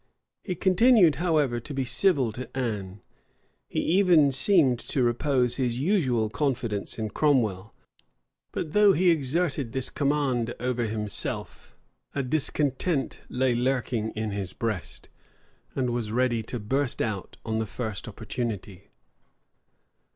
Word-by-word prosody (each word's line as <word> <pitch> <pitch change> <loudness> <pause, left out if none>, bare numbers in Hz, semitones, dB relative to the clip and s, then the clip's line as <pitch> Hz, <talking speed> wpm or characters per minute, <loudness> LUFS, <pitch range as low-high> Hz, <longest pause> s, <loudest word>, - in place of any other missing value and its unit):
He 185 - -4
continued, 190 - +5
however, 150 -8 +1
to 145 +6 -8
be 135 -1 -1
civil 130 - +2
to 125 +4 -7
Anne; 105 -6 -3 0.7
he - - -1
even 170 -6 +4
seemed 135 - +4
to 130 - -1
repose 125 0 +1
his 125 -3 0
usual 130 - +1
confidence 120 -5 -2
in 110 -1 -2
Cromwell; 110 -9 +1 0.8
but 155 - -4
though 210 -1 +6
he 180 +1 +4
exerted 145 -4 0
this 130 -1 -2
command 135 -5 0
over 125 -2 -1
himself, 105 -1 -5 0.4
a 140 - 0
discontent 145 +2 0
lay 130 0 +1
lurking 120 -2 0
in 110 -1 -2
his 100 -2 -4
breast, 110 -9 -4 0.7
and 125 -2 0
was 120 -3 -2
ready 120 -1 +1
to 115 +2 -6
burst 130 +5 -1
out 105 -4 -3
on 110 -1 -1
the 110 - -2
first 110 -1 -5
opportunity. 105 -5 -5
125 Hz, 130 wpm, -26 LUFS, 110-145 Hz, 0.8 s, though